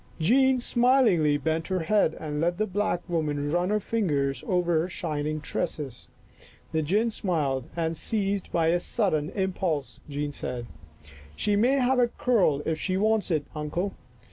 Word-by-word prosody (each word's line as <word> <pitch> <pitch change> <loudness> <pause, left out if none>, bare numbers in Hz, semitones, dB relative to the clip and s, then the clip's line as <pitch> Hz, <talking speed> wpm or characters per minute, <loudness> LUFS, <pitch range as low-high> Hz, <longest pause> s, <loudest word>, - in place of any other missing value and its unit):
Jean 260 +9 +4
smilingly 240 - +3
bent 160 +2 -1
her 185 -2 -1
head 160 -1 +2
and 150 -1 -3
let 175 +1 +1
the 215 - +1
black 205 -3 -1
woman 150 -4 -1
run 175 +2 +1
her 210 0 +2
fingers 145 - -1
over 175 -3 +2
her 170 +3 -1
shining 155 -3 -3
tresses. 150 -4 -4 0.6
The 160 - +1
gin 210 +9 +1
smiled 145 - -1
and, 165 -1 -1
seized 200 +1 -1
by 165 -1 +2
a 175 +1 +3
sudden 170 -7 0
impulse, 180 -7 -2
Jean 145 0 -3
said, 125 -4 -5 0.4
" - - -25 0.3
She 205 - +1
may 240 +6 +3
have 260 -1 +2
a 245 - +5
curl 225 - +1
if 160 -1 -1
she 185 +3 -1
wants 215 +1 +1
it, 155 -4 0
Uncle. 165 +6 -2
175 Hz, 165 wpm, -27 LUFS, 150-210 Hz, 0.6 s, a